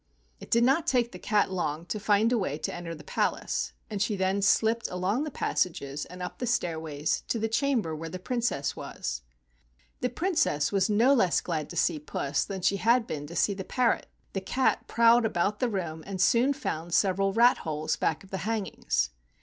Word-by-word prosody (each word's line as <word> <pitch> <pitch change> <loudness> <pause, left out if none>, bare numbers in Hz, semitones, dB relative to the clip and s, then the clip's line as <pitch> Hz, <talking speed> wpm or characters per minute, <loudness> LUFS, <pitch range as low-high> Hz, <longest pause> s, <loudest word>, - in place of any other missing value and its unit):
It - - -11
did 235 +1 +4
not 270 +6 +3
take 245 -3 +2
the 180 - -9
cat 205 -1 +1
long 165 -3 -2
to 215 - -3
find 210 +2 +3
a 245 - +3
way 150 -7 -2
to - - -4
enter 170 -1 -6
the 150 - -12
palace, - - -1
and 205 -3 -4
she 210 +1 +1
then 190 +1 0
slipped 225 +3 +3
along 190 +10 -1
the - - -3
passages 150 - -2
and 180 0 -8
up 180 - -6
the 245 - -2
stairways 160 -9 -1
to - - 0
the 225 0 0
cham¬ 255 +1 +1
ber 160 -1 -4
where 165 +1 -6
the 185 - -5
Princess 185 - -1
was. - - -5 0.8
The 250 - 0
Princess 250 - +1
was 195 +1 +2
no 230 +6 +5
less 190 -10 +3
glad 155 -4 -3
to - - -8
see 155 - +1
Puss 140 -1 -2
than 195 -2 -5
she 200 - +3
had 230 +3 +3
been 145 -6 -5
to 170 - -9
see 200 - +2
the 190 -1 -5
parrot. 245 +4 +1 0.3
The 195 - -2
cat 255 +7 0
prowled 235 +1 +5
about 205 -1 0
the 250 - +1
room 170 -6 -4
and 195 -2 -5
soon 245 +8 +4
found 170 - -3
several 195 0 +2
rat 235 +4 +5
holes 155 -1 -2
back 160 - -1
of 195 - -17
the 190 - -3
hangings. 195 - -1
195 Hz, 205 wpm, -28 LUFS, 165-230 Hz, 0.8 s, no